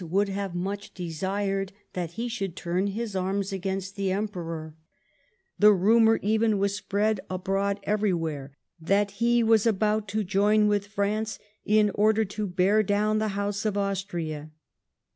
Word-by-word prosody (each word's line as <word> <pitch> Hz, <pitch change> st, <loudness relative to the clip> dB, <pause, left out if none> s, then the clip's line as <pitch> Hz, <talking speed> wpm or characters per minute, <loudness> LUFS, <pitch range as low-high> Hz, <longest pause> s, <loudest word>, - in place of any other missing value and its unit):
would 195 Hz, +4 st, +1 dB
have 195 Hz, -2 st, -3 dB
much 195 Hz, +3 st, -4 dB
desired 195 Hz, +3 st, -2 dB, 0.2 s
that 175 Hz, -2 st, -4 dB
he 230 Hz, +6 st, -3 dB
should 195 Hz, -7 st, -4 dB
turn 180 Hz, +3 st, -1 dB
his 210 Hz, +1 st, -4 dB
arms 195 Hz, +1 st, -1 dB
against 195 Hz, +1 st, -3 dB
the 195 Hz, -2 st, -1 dB
Emperor; 170 Hz, -6 st, -4 dB, 0.8 s
the 210 Hz, +1 st, +8 dB
rumour 225 Hz, +4 st, +4 dB
even 220 Hz, +1 st, +2 dB
was 200 Hz, 0 st, 0 dB
spread 205 Hz, +1 st, 0 dB
abroad 195 Hz, +2 st, -1 dB
everywhere 165 Hz, -9 st, -1 dB, 0.3 s
that 200 Hz, +5 st, +1 dB
he 235 Hz, 0 st, +4 dB
was 225 Hz, 0 st, +4 dB
about 215 Hz, 0 st, +1 dB
to 215 Hz, +2 st, -1 dB
join 210 Hz, +2 st, +3 dB
with 205 Hz, -1 st, +1 dB
France 210 Hz, +1 st, -1 dB, 0.3 s
in 210 Hz, -1 st, +4 dB
order 215 Hz, +1 st, +3 dB
to 205 Hz, +1 st, -4 dB
bear 185 Hz, +4 st, +3 dB
down 210 Hz, +1 st, +1 dB
the 215 Hz, -, 0 dB
House 200 Hz, 0 st, -2 dB
of 210 Hz, -2 st, -1 dB
Austria.' 175 Hz, -6 st, -3 dB
200 Hz, 145 wpm, -27 LUFS, 190-210 Hz, 0.8 s, the